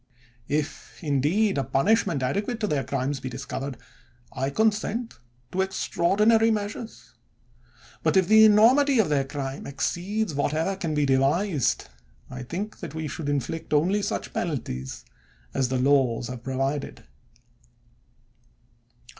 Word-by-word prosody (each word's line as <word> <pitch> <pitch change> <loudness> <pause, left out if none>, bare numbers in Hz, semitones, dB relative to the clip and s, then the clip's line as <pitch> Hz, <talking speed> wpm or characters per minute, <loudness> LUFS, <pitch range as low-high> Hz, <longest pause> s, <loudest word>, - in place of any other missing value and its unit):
If, 150 +1 -3
indeed, 155 +6 +1
a - - 0
punish 200 +14 +2
ment 145 -8 -1
adequate 205 - -1
to 210 - +1
their 145 -7 0
crimes 135 +1 -2
be 130 - -5
discovered, 135 +1 -5 0.6
I 135 +1 -1
consent 220 - 0 0.3
to 190 - 0
extraordinary 205 +4 +2
measures; 215 +1 -4 0.9
but - - +2
if 185 -2 +4
the 220 0 +7
enormity 245 +6 +6
of 220 -8 +3
their 140 -2 +1
crime 135 -1 -5
exceeds 180 +8 -2
whatever 155 +6 0
can 165 -5 -3
be 150 -1 +2
devised, 140 - +1 0.4
I 130 0 -6
think 185 - -5
that 160 -5 -7
we 160 -1 -3
should 150 -1 -4
inflict 150 +3 -2
only 185 +8 +2
such 205 - -3
penalties 65 - -4 0.5
as 130 -2 0
the 130 - 0
laws 130 -3 +2
have 125 -2 -6
provided. 135 +3 -3
155 Hz, 130 wpm, -25 LUFS, 135-205 Hz, 0.9 s, the